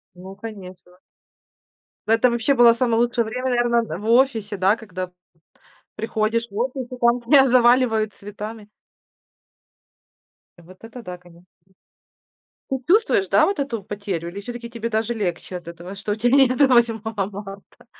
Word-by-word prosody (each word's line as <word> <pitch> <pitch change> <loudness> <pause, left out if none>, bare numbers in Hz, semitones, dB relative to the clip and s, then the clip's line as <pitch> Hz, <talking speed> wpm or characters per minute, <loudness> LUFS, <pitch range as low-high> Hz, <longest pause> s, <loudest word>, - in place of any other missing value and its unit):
Ну, 190 +2 -11
конечно. 185 -4 -11 1.1
Да, 225 - +4
это 245 +2 +3
вообще 240 +4 +1
было 240 -2 +7
самое 230 -1 0
лучшее 240 -1 +1
время, 255 +4 -3
наверно, 240 -1 +2
д 165 -6 -6
в 215 - -6
офисе, 230 -5 +2
да, 190 +4 +2
когда 185 -5 -6
п 180 - -31 0.8
приходишь 225 +1 -1
в 200 - -11
офис 255 +2 -2
и - - -5
там 235 +1 +3
тебя 265 +2 +5
заваливают 240 -3 +3
цветами. 210 +1 -9 1.9
Вот 180 +2 -16
это 235 +2 -10
да, 180 -4 -8
конечно. 175 0 -20 1.2
Ты 265 - -2
чувствуешь, 410 0 +3
да, - - +4
вот 395 -7 -1
эту 235 -7 -3
потерю, 200 -5 -5
или 195 +4 -7
все-таки 240 +2 -8
тебе 230 -1 -5
даже 225 +1 -1
легче 185 -3 -4
от 175 -1 -9
этого, 170 +3 -9
что 205 +1 -4
у - - +1
тя 235 +2 +1
нету 270 +1 +5
8-го 230 -3 +2 0.2
марта? 200 0 -11
225 Hz, 155 wpm, -22 LUFS, 200-240 Hz, 1.9 s, было